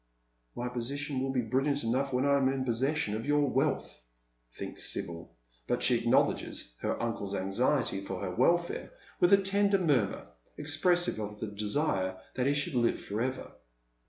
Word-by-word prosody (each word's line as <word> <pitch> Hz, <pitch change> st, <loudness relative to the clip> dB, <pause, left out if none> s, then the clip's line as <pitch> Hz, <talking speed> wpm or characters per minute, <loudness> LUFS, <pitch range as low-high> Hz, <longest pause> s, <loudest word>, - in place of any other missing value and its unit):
" -, -, -42 dB
My 120 Hz, -, -3 dB
position 130 Hz, +3 st, -3 dB
will 135 Hz, -, -1 dB
be 130 Hz, -2 st, +1 dB
brilliant 135 Hz, +5 st, 0 dB
enough 130 Hz, +4 st, 0 dB
when 125 Hz, +1 st, +1 dB
I 140 Hz, 0 st, +4 dB
am 135 Hz, -1 st, +2 dB
in 135 Hz, -1 st, -2 dB
possession 130 Hz, -1 st, 0 dB
of 110 Hz, -, -3 dB
your 145 Hz, 0 st, +3 dB
wealth," 125 Hz, -, -1 dB, 0.5 s
thinks -, -, -3 dB
Sibyl, 85 Hz, 0 st, -5 dB, 0.3 s
but -, -, 0 dB
she -, -, +5 dB
acknowledges -, -, +1 dB
her -, -, -2 dB
uncle's 100 Hz, -4 st, -3 dB
anxiety 100 Hz, +3 st, +1 dB
for 95 Hz, -1 st, -5 dB
her 90 Hz, -2 st, -3 dB
welfare 170 Hz, -, +1 dB, 0.3 s
with 175 Hz, -, +4 dB
a 200 Hz, -, +9 dB
tender 200 Hz, +1 st, +2 dB
murmur, 145 Hz, -, +1 dB, 0.3 s
expressive 160 Hz, 0 st, +2 dB
of 105 Hz, 0 st, -5 dB
the -, -, -2 dB
desire 105 Hz, -3 st, -1 dB, 0.2 s
that 125 Hz, +1 st, 0 dB
he 140 Hz, -, +2 dB
should 145 Hz, +3 st, -1 dB
live 120 Hz, -2 st, +2 dB
for 105 Hz, +3 st, -4 dB
ever. 130 Hz, +1 st, -3 dB
130 Hz, 170 wpm, -30 LUFS, 105-145 Hz, 0.5 s, a